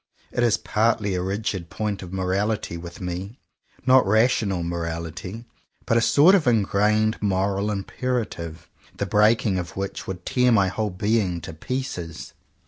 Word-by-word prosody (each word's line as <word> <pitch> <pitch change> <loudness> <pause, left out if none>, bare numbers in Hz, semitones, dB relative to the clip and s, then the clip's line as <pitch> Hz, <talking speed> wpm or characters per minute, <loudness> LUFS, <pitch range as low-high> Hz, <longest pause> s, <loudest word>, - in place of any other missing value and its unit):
It - - -1
is 120 -3 +3
partly 105 -2 +1
a 90 - -1
rigid 95 -2 -3
point 105 -2 -3
of 90 -2 -8
morality 95 +1 -1
with 85 0 -8
me, 90 +6 -5 0.2
— - - -33
not 130 0 +6
rational 110 -4 +2
morality, 85 +5 -5 0.4
but 115 - +1
a 115 - +4
sort 150 +10 +6
of 180 -8 +3
ingrained 110 0 +2
moral 100 0 0
imperative, 100 -6 -3 0.3
the - - -1
breaking 105 -2 +3
of 90 +1 -7
which 100 0 -4
would 90 -2 -6
tear 125 -1 +3
my 100 -4 +4
whole 105 +2 -2
being 95 -1 0
to 80 - -7
pieces. 90 - -5
100 Hz, 150 wpm, -24 LUFS, 90-110 Hz, 0.4 s, not